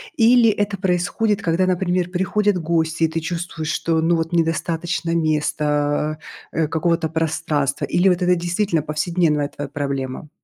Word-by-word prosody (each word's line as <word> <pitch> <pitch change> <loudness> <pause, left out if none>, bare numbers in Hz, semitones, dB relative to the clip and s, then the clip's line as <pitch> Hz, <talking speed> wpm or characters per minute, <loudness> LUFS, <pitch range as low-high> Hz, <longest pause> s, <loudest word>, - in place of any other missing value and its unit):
или 235 -1 +5
это 205 -1 -1
происходит, 190 +3 0
когда, 175 +2 +1
например, 180 -1 0
приходят 195 +2 +1
гости, 160 0 0
и - - +5
ты 160 +1 -3
чувствуешь, 165 -1 -4
что, 165 -1 0
ну, 170 +1 +2
вот 165 +1 -2
недостаточно 165 +1 -1
места, 150 -1 0 0.3
э, 160 -1 0
какого-то 165 0 0
пространства, 155 -3 -1
или 190 +2 +3
вот 180 0 +1
это 180 0 +3
действительно 175 -1 0
повседневная 155 -1 0
твоя 145 -1 -7
проблема? 140 -1 -4
165 Hz, 145 wpm, -21 LUFS, 155-180 Hz, 0.3 s, или